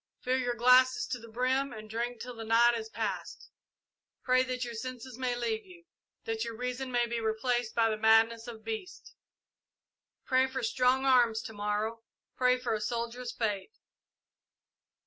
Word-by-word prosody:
Fill 255 +1 0
your 245 -1 -1
glasses 250 +2 +5
to 250 - -4
the 230 - -12
brim 255 +4 0
and 215 -2 -9
drink 235 +2 -3
till 250 0 -7
the 225 - -7
night 230 +2 +5
is 220 -1 -5
past. - - -5 0.7
Pray 255 0 +4
that 255 -1 -2
your 240 - -6
senses 255 +1 -6
may 250 -1 0
leave 230 -2 -2
you 355 -2 -16 0.4
that 225 0 -2
your 230 -1 -6
reason 250 +2 -3
may 240 -1 +2
be 235 0 -3
replaced 225 +1 -1
by 230 -1 +4
the 215 -1 -1
madness 225 +1 +4
of 225 -2 -9
beasts! 225 - -6 1.1
Pray 260 0 +3
for 260 -1 -4
strong 255 +3 +2
arms 240 -4 +4
to 225 - -8
morrow 210 +2 -2 0.3
pray 250 0 +3
for 250 -2 -2
a 215 - -2
soldier's 235 +2 -3
fate! 220 - -3
240 Hz, 165 wpm, -30 LUFS, 225-255 Hz, 1.1 s, glasses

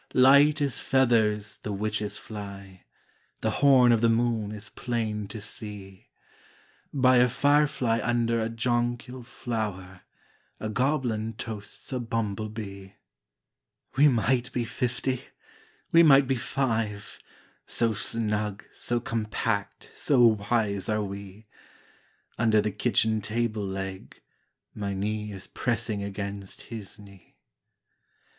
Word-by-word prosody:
Light 140 +4 +6
as 140 -3 0
feathers 110 -5 +2
the 105 - -5
witches 105 +1 -2
fly, 100 -3 -9 0.6
The 110 - +1
horn 130 -4 +7
of 115 -2 +3
the 115 - +4
moon 115 -2 +1
is 105 0 -6
plain 110 -4 -3
to 110 - -7
see; 100 -2 -7 0.8
By 130 -2 +4
a 125 +1 +5
firefly 140 -3 +2
under 115 -1 +1
a 110 0 -1
jonquil 120 +2 -1
flower 105 -6 -5 0.6
A 110 - -3
goblin 120 -3 0
toasts 110 +3 -7
a 130 - -1
bumble 110 -3 -2
bee. 100 -2 -8 1.0
We 145 +3 +6
might 125 0 +1
be 120 -2 -1
fifty, 125 +1 -2 0.7
we 165 - +7
might 140 -4 +7
be 135 +1 +1
five, 115 -5 -2 0.5
So 115 -1 +1
snug, 105 -1 -1
so 120 0 -1
compact, 110 -2 -2
so 135 -4 +2 0.3
wise 105 -5 +1
are 110 0 +1
we! 100 +1 -8 0.9
Under 110 -1 +4
the 105 0 0
kitchen 110 +1 +1
table 110 -1 -2
leg 95 0 -6 0.5
My 100 -2 -3
knee 105 +2 -2
is 95 -1 -6
pressing 115 -3 -2
against 100 -1 -6
his 110 -2 -8
knee. 100 -4 -17
110 Hz, 120 wpm, -27 LUFS, 105-120 Hz, 1.0 s, horn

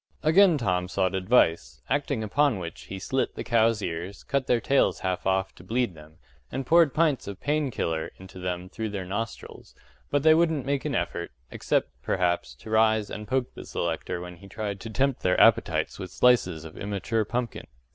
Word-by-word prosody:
” - - -35
Again 170 +2 +6
Tom 90 -7 0
sought 95 -1 0
advice, 95 -3 +2
acting 140 -4 -1
upon 135 +3 +2
which 85 -3 -7
he 95 - -6
slit 130 +7 -1
the - - -4
cows' 115 -2 +2
ears, 85 +4 -5
cut 140 -2 -1
their 120 - +3
tails 135 +4 +2
half 95 0 -2
off 95 0 +1
to - - -15
bleed 115 +1 0
them, 80 0 -15 0.4
and 135 - -3
poured 165 -1 +4
pints 155 -8 +2
of 100 -1 -6
“pain 150 -1 0
killer” 80 -9 -2
into 95 0 -12
them 90 0 -3
through 110 +3 -4
their 100 -2 -4
nostrils; 105 +5 -6 0.3
but 145 -1 +1
they 160 0 +7
wouldn't 160 -4 +2
make 140 0 -1
an 150 - -1
effort, 85 0 -2 0.2
except, - - 0
perhaps, 85 -8 0
to 85 +12 -11
rise 110 -1 +3
and 105 0 -6
poke 130 +2 -1
the - - -9
selector 85 +1 -3
when 90 0 -8
he 100 - -14
tried 100 0 -4
to 115 - -7
tempt 135 +3 0
their 90 - +2
appetites - - +3
with 95 -2 -6
slices 95 -8 +2
of 80 - -10
immature 105 +2 -1
pumpkin. 120 +2 -4
105 Hz, 195 wpm, -26 LUFS, 90-130 Hz, 0.4 s, they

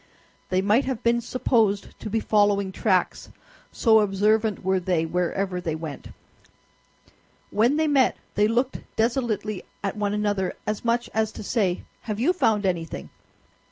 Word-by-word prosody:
They 185 0 +1
might 215 +7 +3
have 260 -4 -3
been 235 0 +2
supposed 225 -4 0
to 215 - -6
be 225 - 0
following 205 -3 +2
tracks, 185 -2 0 0.4
so 220 -2 +4
observant 210 +1 +1
were 190 0 +2
they 175 -3 0
wherever 180 +2 -1
they 160 -3 -2
went. 160 -3 -7 1.4
When 235 +8 +3
they 315 - +2
met 280 -4 +3 0.2
they 210 +1 +3
looked 245 +4 0 0.2
desolately 225 -4 -1 0.2
at 200 - -2
one 205 -1 -1
another, 205 -3 0
as 215 -1 -3
much 235 0 +1
as 220 0 0
to - - -8
say, 195 -5 0 0.2
"Have 215 -2 -3
you 305 +10 +3
found 215 - +1
anything?" 170 -3 -3
210 Hz, 150 wpm, -25 LUFS, 190-230 Hz, 1.4 s, so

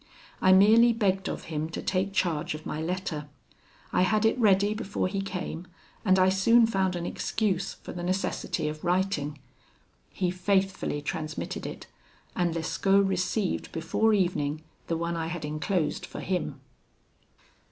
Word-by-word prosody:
I 185 - +5
merely 220 +5 +7
begged 195 -4 0
of - - -5
him 155 0 -3
to 165 - -5
take 190 +1 0
charge 170 -6 0
of 155 - -10
my 150 - -3
letter; 160 -4 -3 0.6
I - - +3
had 215 +4 +2
it 220 - +4
ready 205 -2 +4
before 210 -3 -2
he 195 +1 -2
came, 185 -3 -5 0.4
and 190 -3 +4
I 185 0 +5
soon 230 +5 +5
found 190 -4 0
an 175 -1 -3
excuse 195 -2 -1
for - - -9
the 175 - -5
necessity 185 -3 -1
of 155 0 -5
writing. 175 -5 0 0.7
He 180 -2 -1
faithfully 190 -4 0
transmitted 155 +2 -4
it, - - -8 0.5
and 175 -2 0
Lescaut 195 +4 +2
received 190 +1 -1
before 195 +7 +1
evening 160 -7 0 0.2
the 165 - 0
one 170 +1 -2
I 165 -1 -2
had 170 -2 -4
enclosed 155 +3 -1
for - - -7
him. 170 -7 -2
185 Hz, 150 wpm, -28 LUFS, 165-195 Hz, 0.7 s, merely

